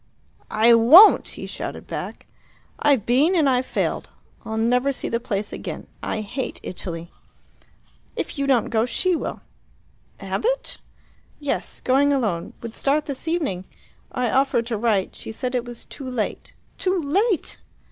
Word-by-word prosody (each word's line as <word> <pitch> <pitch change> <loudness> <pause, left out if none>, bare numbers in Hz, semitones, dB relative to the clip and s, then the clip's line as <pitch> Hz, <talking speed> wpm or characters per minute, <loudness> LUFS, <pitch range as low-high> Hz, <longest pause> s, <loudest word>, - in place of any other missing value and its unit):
"I 225 +2 +6
won't!" 285 - +8
he - - -6
shouted - - -6
back. - - -6 0.5
"I've 280 -8 +3
been 285 +10 +3
and 315 -5 +4
I've 255 -1 +2
failed. - - -2 0.3
I'll 220 0 -4
never 250 +4 +2
see 270 - -5
the 230 - 0
place 210 -4 -3
again. - - -6 0.2
I 215 - -2
hate 245 +5 -4
Italy." 170 -2 -6 1.0
"If - - -4
you 275 - 0
don't 255 -5 +2
go, 225 +1 +2
she 365 +9 +1
will." - - -4 0.8
"Abbott?" - - -2 0.6
"Yes. 285 -2 -3
Going 275 +3 +3
alone; 215 -12 -1
would 230 -1 -6
start 290 +4 +1
this 280 +2 -6
evening. 290 - -1 0.5
I 250 -2 -1
offered 265 -3 +2
to 235 -1 -2
write; 205 -4 0
she - - -7
said 250 +3 -4
it 250 -1 -1
was 240 -1 -8
'too 270 -3 -8
late!' 240 -4 -4 0.2
Too 375 -1 +1
late! 370 +6 0
250 Hz, 150 wpm, -23 LUFS, 225-285 Hz, 1.0 s, won't